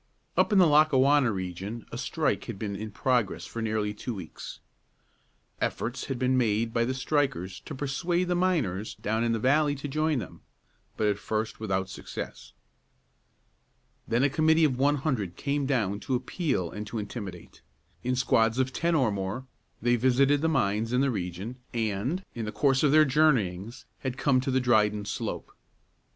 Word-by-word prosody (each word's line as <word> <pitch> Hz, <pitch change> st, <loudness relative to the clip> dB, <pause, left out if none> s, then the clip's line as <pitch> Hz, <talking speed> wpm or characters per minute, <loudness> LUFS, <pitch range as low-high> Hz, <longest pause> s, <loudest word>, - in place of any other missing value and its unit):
Up -, -, +3 dB
in 205 Hz, -, +4 dB
the 185 Hz, -, +7 dB
Lackawanna 145 Hz, -4 st, +5 dB
region 95 Hz, +4 st, -5 dB
a -, -, -5 dB
strike -, -, -1 dB
had -, -, -6 dB
been 100 Hz, -1 st, -4 dB
in 110 Hz, +2 st, -5 dB
progress 120 Hz, 0 st, 0 dB
for 115 Hz, -, -6 dB
nearly 110 Hz, -2 st, -1 dB
two 115 Hz, +3 st, -5 dB
weeks. 90 Hz, -5 st, -8 dB, 1.0 s
Efforts 125 Hz, +3 st, -2 dB
had 135 Hz, -, -3 dB
been 130 Hz, +1 st, +2 dB
made 115 Hz, -1 st, +1 dB
by 115 Hz, 0 st, +2 dB
the 130 Hz, +2 st, -2 dB
strikers 130 Hz, -, -1 dB
to -, -, -6 dB
persuade 170 Hz, +7 st, -1 dB
the 180 Hz, -, +1 dB
miners 150 Hz, -, 0 dB
down 110 Hz, +2 st, 0 dB
the 115 Hz, -, +1 dB
valley 145 Hz, +5 st, +3 dB
to 140 Hz, +1 st, -5 dB
join 155 Hz, +1 st, 0 dB
them, 120 Hz, -, -7 dB, 0.6 s
but 110 Hz, -, +1 dB
at 105 Hz, -1 st, +1 dB
first 110 Hz, +1 st, -3 dB
without 95 Hz, -3 st, -1 dB
success. 95 Hz, -, -8 dB, 1.5 s
Then 120 Hz, +3 st, +2 dB
a 140 Hz, -, +4 dB
committee 160 Hz, +2 st, +4 dB
of 145 Hz, -5 st, +3 dB
one 145 Hz, +2 st, +4 dB
hundred 125 Hz, -, -2 dB
came 140 Hz, 0 st, -1 dB
down 105 Hz, -7 st, 0 dB
to 130 Hz, -, -1 dB
appeal 125 Hz, -, -1 dB
and 105 Hz, 0 st, -6 dB
to 115 Hz, -, -5 dB
intimidate. 100 Hz, -5 st, -7 dB, 0.4 s
In 125 Hz, +1 st, 0 dB
squads 115 Hz, -2 st, +2 dB
of 130 Hz, 0 st, 0 dB
ten 170 Hz, 0 st, +1 dB
or 130 Hz, -8 st, +3 dB
more 100 Hz, +6 st, -3 dB, 0.4 s
they 120 Hz, 0 st, +3 dB
visited 135 Hz, +4 st, +3 dB
the 160 Hz, -, +2 dB
mines 110 Hz, -4 st, 0 dB
in 125 Hz, -, +3 dB
the 135 Hz, -1 st, +2 dB
region, 95 Hz, +4 st, -4 dB, 0.2 s
and, 115 Hz, -, -1 dB
in 115 Hz, -2 st, -4 dB
the 105 Hz, -, -3 dB
course 135 Hz, +4 st, +2 dB
of 150 Hz, -, +4 dB
their 155 Hz, +1 st, +7 dB
journeyings, 120 Hz, -, +1 dB
had 130 Hz, -2 st, -4 dB
come 135 Hz, -1 st, +3 dB
to 130 Hz, -, -3 dB
the 130 Hz, 0 st, +2 dB
Dryden 105 Hz, -4 st, +2 dB
Slope. 100 Hz, -, -4 dB
125 Hz, 175 wpm, -28 LUFS, 105-140 Hz, 1.5 s, the